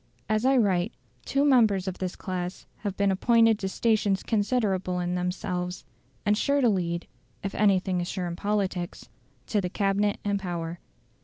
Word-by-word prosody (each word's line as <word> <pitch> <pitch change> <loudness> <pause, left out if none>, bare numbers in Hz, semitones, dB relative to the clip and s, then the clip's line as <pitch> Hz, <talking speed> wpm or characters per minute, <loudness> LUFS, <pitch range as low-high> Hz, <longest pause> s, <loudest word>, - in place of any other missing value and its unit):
As 215 +3 +1
I 265 0 +5
write, 195 -3 +2 0.3
two 275 +1 +2
members 220 -9 +4
of 190 - -4
this 185 -1 -3
class 180 -1 -4
have 200 -3 -4
been 200 -1 +3
appointed 225 +2 +4
to 190 - -2
stations 210 -2 +1
considerable 205 -5 0
in 175 0 -1
themselves, 180 0 -3 0.4
and 210 0 +4
sure 280 +6 +2
to 250 -4 +4
lead 170 -4 -1 0.4
(if 195 - -3
anything 190 -3 +2
is 175 - -3
sure 185 -1 -3
in 170 -1 -3
politics) 190 -3 -2 0.4
to 210 - 0
the 180 - -2
Cabinet 200 +1 +1
and 200 -1 +1
power. 170 -2 -4
195 Hz, 165 wpm, -27 LUFS, 180-215 Hz, 0.4 s, I